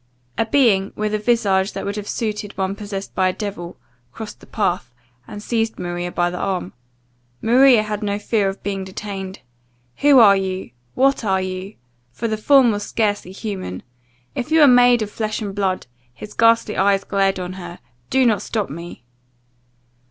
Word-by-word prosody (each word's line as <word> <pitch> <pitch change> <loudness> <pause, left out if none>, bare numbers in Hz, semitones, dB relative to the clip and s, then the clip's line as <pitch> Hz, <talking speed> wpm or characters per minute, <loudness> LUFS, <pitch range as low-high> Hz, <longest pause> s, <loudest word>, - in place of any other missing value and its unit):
A 225 - 0
being, 220 -7 +3
with 215 0 -2
a 215 - +1
visage 205 -4 +1
that - - -5
would 200 - -3
have 210 -1 -6
suited 210 -2 -4
one 190 0 -1
possessed 200 -1 -6
by 185 - +2
a 185 - 0
devil, 195 -5 -6 0.3
crossed 220 - -8
the - - -17
path, 180 - -1 0.4
and 205 0 -8
seized 225 -1 -1
Maria 175 0 -4
by 175 0 0
the 180 - -5
arm. 190 -2 -2 0.7
Maria 245 0 +5
had 210 0 -4
no 205 -1 -1
fear 210 -1 0
but 195 - -2
of - - -38
being 195 -1 -3
detained 190 0 -7 0.6
"Who 285 -1 +5
are 210 -5 +8
you? 190 -5 -3 0.2
what 275 -1 +2
are 190 -3 +1
you?" 185 +2 -6 0.4
for 230 - -3
the 220 - -1
form 255 +2 +5
was 205 -1 -2
scarcely 205 -3 -1
human. 190 - -6 0.5
"If 250 - -4
you 315 -1 +5
are - - +8
made 245 -2 +6
of 205 - -7
flesh 215 -1 -3
and 205 -3 -4
blood," 190 -2 -1 0.3
his 210 +12 -11
ghastly 230 -1 +3
eyes 195 0 +3
glared 195 -1 0
on 180 0 -5
her, 175 -2 -8 0.3
"do 265 -1 +3
not 215 -5 +2
stop 215 -8 -3
me!" 170 -4 -9
205 Hz, 180 wpm, -20 LUFS, 190-225 Hz, 0.7 s, are